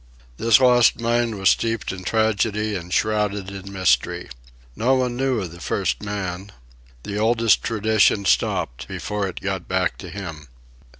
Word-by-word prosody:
This 115 0 +5
lost 125 -2 +5
mine 120 -1 0
was 95 0 +4
steeped 115 -2 -1
in 95 -1 -8
tragedy 110 0 0
and 90 -2 -6
shrouded 105 -2 0
in 100 0 -8
mystery. 95 -2 +1 0.5
No 125 +4 +2
one 125 -2 0
knew 130 -2 0
of 90 -4 -5
the 85 +1 -12
first - - -1
man. 100 -1 -5 0.5
The 100 +1 -4
oldest 115 0 +3
tradition 110 -2 +2
stopped - - 0
before 105 -1 -3
it 95 - -7
got 95 -3 -3
back 95 0 -1
to 90 - -8
him. 80 -6 -8
105 Hz, 155 wpm, -22 LUFS, 95-115 Hz, 0.5 s, This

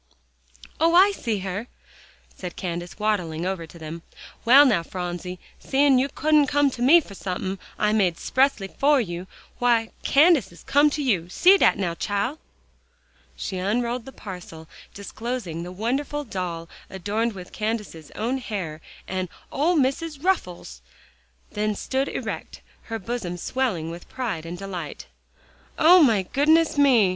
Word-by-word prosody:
"Oh! 330 +1 +4
I 385 +3 +7
see 230 - -2
her," 200 +5 -4 0.7
said 180 -2 -7
Candace, 175 -1 -5
waddling 180 -6 -1
over 185 -3 -3
to 170 - -14
them. 160 +1 -7 0.4
"Well, 270 +5 +8
now, 225 -10 +3
Phronsie, 180 +1 -5 0.2
seein' 275 -1 +3
you 270 +2 +1
couldn't 300 -1 +3
come 285 0 +2
to 245 - -7
me 310 +8 +7
for 210 - -12
somethin' 190 0 -4 0.2
I 210 0 +2
made 190 -6 +2
'xpressly 260 -3 0
fer 285 0 +5
you, 180 -5 -4 0.3
w'y, 235 -2 +2
Candace 290 - +4
has 175 - -16
to - - -15
come 290 +2 +6
to 295 0 -3
you. 185 -10 0
See 365 - +6
dat - - +4
now, 180 -4 -1
chile!" 205 - -2 1.0
She 190 - -4
unrolled 235 +5 -1
the 270 - -9
parcel, 180 -8 -9 0.2
disclosing 200 -4 -5
the 175 +1 -6
wonderful 265 +9 -2
doll 180 -8 -5 0.2
adorned 210 +5 -2
with 180 -2 -10
Candace's 210 -8 -4
own 245 +5 -1
hair, 180 -10 -5 0.3
and 185 -1 -3 0.2
"Ole 320 +6 +2
Missus' 300 +2 0
ruffles," 180 - -2 0.7
then 210 0 -1
stood 265 +6 -1
erect, - - -5 0.2
her 225 - -4
bosom 200 -4 -4
swelling 180 -7 -2
with 170 +1 -10
pride 210 -11 -4
and 175 +1 -6
delight. 180 - -6 0.7
"O 355 +3 +7
my 225 -9 +4
goodness 310 - +3
me!" 265 -8 +5
215 Hz, 150 wpm, -24 LUFS, 180-270 Hz, 1.0 s, Well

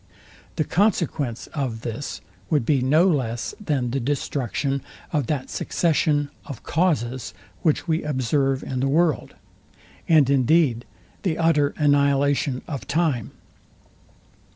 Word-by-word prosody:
The - - +1
consequence 160 - 0
of 125 -6 -3
this 115 +5 -5 0.3
would 145 -7 +2
be 140 -1 +2
no 155 +8 +4
less 120 -9 -1
than 135 - 0
the 135 - 0
destruction 140 +1 -1 0.3
of 145 -6 0
that 140 -4 -2
succession 150 -3 +1
of 135 -5 -9
causes, 130 - 0 0.3
which 160 +1 +1
we 160 0 +1
observe 135 -1 0
in 130 - -3
the 135 - +1
world; 160 0 +1 0.7
and 155 -5 +6
indeed, 135 -2 +3 0.4
the 170 -5 -1
utter 150 -3 +2
annihilation 140 -2 +2
of 140 -4 -5
time. 150 -7 0
140 Hz, 120 wpm, -23 LUFS, 130-155 Hz, 0.7 s, and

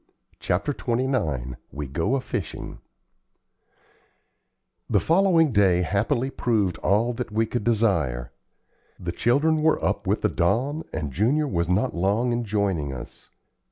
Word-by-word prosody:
CHAPTER 100 +12 -1
XXIX 110 - -1
WE 75 0 -5
GO 80 - -1
A 135 - -1
FISHING - - -5 2.1
The - - +3
following 165 -3 +3
day, 95 -4 +3
happily, 115 - 0
proved 105 - 0
all 115 +5 +2
that 120 -1 -5
we 110 +2 +1
could 120 0 -3
desire. 85 - +1 0.7
The 90 -1 -3
children 145 - +2
were 160 +1 +3
up - - -1
with - - +1
the - - +2
dawn, 135 - 0
and 75 -3 -4
Junior 135 - +2
was 85 -6 -1
not 100 +8 +1
long 105 +8 +1
in 120 0 -1
joining 100 -9 -1
us. 65 - -10
110 Hz, 135 wpm, -24 LUFS, 85-130 Hz, 2.1 s, The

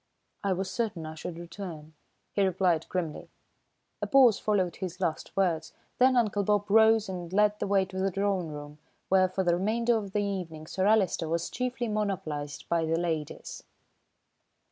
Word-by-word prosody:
"I 200 -1 +2
was 185 +1 -3
certain 210 -9 -2
I 155 - -6
should 165 +2 -7
return," 165 -3 -8 0.4
he 200 - +1
replied 180 -4 +1
grimly. 170 -4 -3 0.7
A - - -1
pause 255 -6 +6
followed 190 -5 0
his 185 -1 -5
last 170 -1 -3
words, 165 -4 0 0.3
then 255 +1 +5
Uncle 210 -4 +2
Bob 205 0 +2
rose 220 0 +5
and 180 -2 -6
led 210 +1 +3
the - - -1
way 195 -1 +3
to 190 0 -6
the 195 +1 +1
drawing 195 -2 0
room, 150 0 -8 0.3
where 185 -1 +4
for 190 +1 -1
the 175 -1 +3
remainder 230 +6 +1
of 200 -3 -3
the 210 - +1
evening 175 -6 -4
Sir 190 +4 -1
Alister 190 -6 +2
was 170 +1 -1
chiefly 250 -1 -2
monopolised 190 -9 -3
by 170 -1 +1
the 160 +1 +1
ladies. 160 -3 -3
190 Hz, 170 wpm, -29 LUFS, 165-205 Hz, 0.7 s, pause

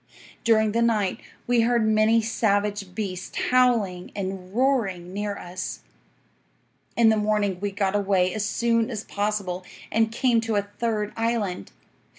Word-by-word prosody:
During 220 -2 +3
the 230 +2 +1
night 215 -5 +1 0.3
we 245 -1 +3
heard 235 -1 +2
many 220 +1 +4
savage 205 -3 0
beasts 185 -4 -5
howling 230 -8 +2
and 190 -2 -5
roaring 205 -8 0
near 205 0 -3
us. 180 +1 -6 1.2
"'In 230 -1 +6
the 220 - +3
morning 210 -3 0
we 205 +1 -1
got 195 0 -1
away 190 -3 +2
as 215 - -2
soon 230 +2 +1
as 220 -3 -4
possible, 200 -4 -2 0.3
and 225 0 +2
came 235 -1 +2
to 225 -1 -2
a 205 - +2 0.2
third 215 -3 -1
island. 225 - -2
210 Hz, 145 wpm, -25 LUFS, 195-230 Hz, 1.2 s, In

